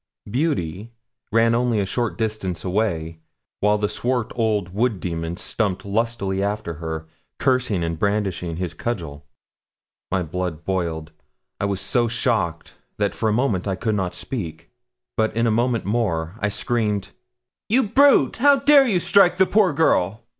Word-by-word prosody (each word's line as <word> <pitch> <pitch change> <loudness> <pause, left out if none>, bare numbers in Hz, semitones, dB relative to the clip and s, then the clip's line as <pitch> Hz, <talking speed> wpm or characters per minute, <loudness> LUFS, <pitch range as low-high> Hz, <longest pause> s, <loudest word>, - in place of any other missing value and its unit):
'Beauty' 105 - -2 0.4
ran 115 +1 +4
only 120 -2 +1
a 100 - +1
short 120 +3 -2
distance 105 -6 -2
away, 85 -5 -1 0.4
while 105 +1 +3
the 105 0 0
swart 120 +3 -1
old 110 -6 0
wood 110 -1 0
demon 85 -1 -4
stumped 100 -3 -2
lustily 100 -2 -1
after 100 -3 -2
her, 80 -1 -4 0.3
cursing 125 -9 +1
and 85 -1 -3
brandishing 100 -5 -1
his 90 0 -3
cudgel. 80 -11 -5 0.8
My 95 -1 +1
blood 85 -1 -4
boiled. 85 -4 -2 0.5
I - - 0
was 100 -1 -1
so 120 -3 +1
shocked 115 - -1 0.2
that 100 -1 0
for 110 - 0
a - - +1
moment 110 -6 0
I 95 - 0
could 110 +3 -1
not 95 -3 -2
speak; 80 -10 -6 0.5
but 110 0 0
in 115 - +2
a 115 - +2
moment 120 +1 +1
more 95 -7 -1
I 105 - 0
screamed 105 -2 -1 0.6
'You 255 +5 +4
brute! 275 +7 +4
How 285 +4 +6
dare 275 0 +5
you 195 -6 +2
strike 180 0 +4
the 190 - +5
poor 200 -2 +3
girl?' 115 - +1
105 Hz, 155 wpm, -22 LUFS, 90-120 Hz, 0.8 s, How